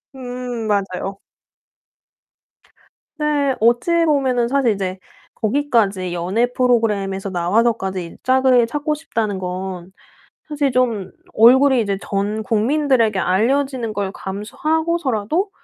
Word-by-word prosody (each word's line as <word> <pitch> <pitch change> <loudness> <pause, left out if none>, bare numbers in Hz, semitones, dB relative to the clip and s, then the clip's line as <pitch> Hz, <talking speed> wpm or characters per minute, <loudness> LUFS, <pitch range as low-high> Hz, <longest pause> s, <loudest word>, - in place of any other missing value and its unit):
음, 245 -3 -5
맞아요. 195 -1 -2 2.0
네. 290 -3 +1
어찌보면은 260 0 +2
사실 265 -3 +2
이제 190 -1 -4 0.4
거기까지 215 -7 0
연예 185 +8 0
프로그램에서 210 -6 0
나와서까지 190 +1 0
이 - - -13
짝을 255 -2 +4
찾고 295 +5 -2
싶다는 225 -10 -3
건 185 0 -5 0.6
사실 290 -2 0
좀 235 -7 0 0.2
얼굴이 260 +3 +6
이제 200 -3 -1
전 205 +2 -2
국민들에게 230 -1 +1
알려지는 240 +5 0
걸 200 -2 -3
감수하고서라도 305 - -2
230 Hz, 255 characters per minute, -19 LUFS, 195-265 Hz, 2.0 s, 얼굴이